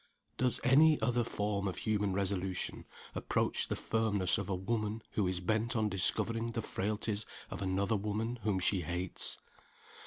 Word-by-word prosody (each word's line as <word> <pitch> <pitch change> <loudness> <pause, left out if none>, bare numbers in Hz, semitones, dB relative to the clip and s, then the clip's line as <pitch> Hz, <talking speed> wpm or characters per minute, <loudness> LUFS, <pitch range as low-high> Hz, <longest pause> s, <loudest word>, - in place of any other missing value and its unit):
Does 125 -1 +3
any 150 +4 +6
other 120 -1 +1
form 105 -3 -2
of 95 - -3
human 105 -2 0
resolution 95 -1 -1 0.3
approach - - +1
the - - -1
firmness 105 -5 +1
of 100 - -4
a 95 - +1
woman 110 +3 -2
who 100 -3 +1
is 90 0 -1
bent 110 +4 0
on 110 -2 +2
discovering 115 +4 0
the 115 - -2
frailties 105 +1 -2 0.3
of - - -5
another 100 +3 +1
woman 110 +4 -2
whom 105 -2 +1
she 95 0 +2
hates? 85 +2 0
105 Hz, 155 wpm, -33 LUFS, 95-115 Hz, 0.3 s, any